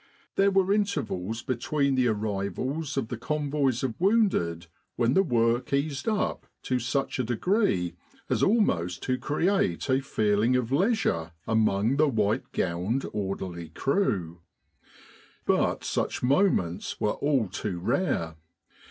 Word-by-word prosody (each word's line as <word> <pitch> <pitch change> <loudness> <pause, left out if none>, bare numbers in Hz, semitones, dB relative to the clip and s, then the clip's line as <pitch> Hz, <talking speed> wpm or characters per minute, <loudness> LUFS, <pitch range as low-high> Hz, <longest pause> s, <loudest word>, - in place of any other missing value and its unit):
There 195 0 +4
were 195 0 +3
intervals 130 - -2
between 140 +2 0
the 130 -1 +2
arrivals 110 +8 -2
of 120 -5 -1
the 120 - -5
convoys 140 -3 0
of 130 -4 -1
wounded 185 - +2 0.3
when 120 +1 +2
the 190 - +5
work 120 -6 +1
eased 140 +5 -1
up 215 -2 -1 0.2
to 130 -1 0
such 135 +1 -1
a - - +2
degree 120 - +1 0.3
as - - 0
almost 90 - +1
to 130 -1 -1
create 190 +10 0
a 130 +1 +3
feeling 110 -2 +1
of 125 -1 0
leisure 140 - +1
among 110 +2 +2
the 155 0 +4
white 110 -3 0
gowned 95 +9 -1
orderly 95 -4 -4
crew. 90 - -1 1.0
But - - +1
such - - -2
moments 125 - +1
were 105 - +1
all 140 -6 +1
too 90 +1 -4
rare. 85 - -1
125 Hz, 130 wpm, -27 LUFS, 100-150 Hz, 1.0 s, the